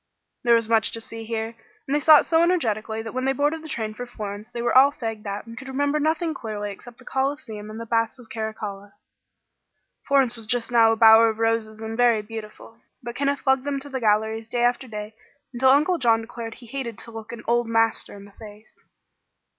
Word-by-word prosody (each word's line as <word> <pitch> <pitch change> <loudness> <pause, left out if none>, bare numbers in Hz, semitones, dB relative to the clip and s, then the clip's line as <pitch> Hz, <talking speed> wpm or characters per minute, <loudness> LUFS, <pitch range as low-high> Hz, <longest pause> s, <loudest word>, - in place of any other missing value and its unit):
There 235 -1 +5
was 230 -1 +1
much 225 -1 +3
to 230 - -3
see 225 0 -8
here, 225 0 -3 0.3
and 275 - -2
they 295 - +3
saw 305 +1 +8
it - - -7
so 325 0 +3
energetically 225 - 0
that 225 - -7
when 255 0 -2
they 270 - +2
boarded 295 +4 0
the 315 - -10
train 220 -5 -3
for 245 +3 -7
Florence 210 -2 -7
they 235 -1 -4
were 240 - 0
all 270 +2 +7
fagged 225 -5 -6
out 200 +1 -4
and 230 0 -10
could 265 +2 -9
remember 285 +3 0
nothing 320 +2 0
clearly 210 -5 -5
except 235 +4 -12
the 255 - -17
Coliseum 265 -6 -3
and 215 +1 -8
the 230 - -6
Baths 230 +1 0
of 245 -3 -15
Carracalla. 210 -3 -6 1.1
Florence 270 -4 +3
was 225 -2 -7
just 245 0 0
now 230 -2 +5
a - - +2
bower 225 0 +7
of 220 - -4
roses 225 -1 -1
and 220 0 -5
very 235 -3 +3
beautiful. 225 +1 -10 0.2
But 240 0 -5
Kenneth 280 +1 -1
lugged 265 -1 +3
them 280 -1 -2
to 285 +1 -9
the 265 -1 -3
galleries 220 0 +1
day 240 0 0
after 245 +2 +1
day 210 -1 -7 0.4
until 260 +2 +3
Uncle 300 +6 +4
John 230 -3 +3
declared 225 0 -7
he 245 - -14
hated 235 -2 -5
to 230 - -8
look 225 0 -8
an 235 - -8
"old 240 0 +2
master" 225 -1 0
in 200 - -12
the 205 - -16
face. 210 0 -15
230 Hz, 225 wpm, -24 LUFS, 220-265 Hz, 1.1 s, saw